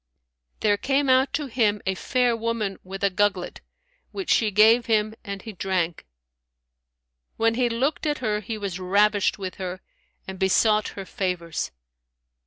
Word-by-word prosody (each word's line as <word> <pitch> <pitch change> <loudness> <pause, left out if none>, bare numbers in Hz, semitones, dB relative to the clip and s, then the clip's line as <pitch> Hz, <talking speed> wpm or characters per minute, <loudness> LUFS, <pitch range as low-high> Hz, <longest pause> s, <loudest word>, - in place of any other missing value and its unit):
There 205 -1 +3
came 275 +4 +1
out 260 +1 +4
to 295 +1 -1
him 220 -5 +1
a 190 - +1
fair 240 +7 +1
woman 230 -3 -2
with 195 +1 -8
a 200 - +3
gugglet, 195 -1 0 0.5
which 385 -2 -3
she 220 - +3
gave 220 +4 +5
him, 215 -1 +2
and 200 -1 -6
he 220 - -7
drank. 180 - -2 1.3
When 225 0 +2
he 245 +1 +1
looked 265 +7 -1
at 295 0 0
her, 215 -4 -1
he 215 +2 -5
was 195 -3 -4
ravished 200 +2 +2
with 190 -2 -6
her 185 -1 -5 0.5
and 190 -1 -7
besought 210 +2 +3
her 195 - -5
favours. 175 - -3
210 Hz, 155 wpm, -24 LUFS, 190-230 Hz, 1.3 s, gave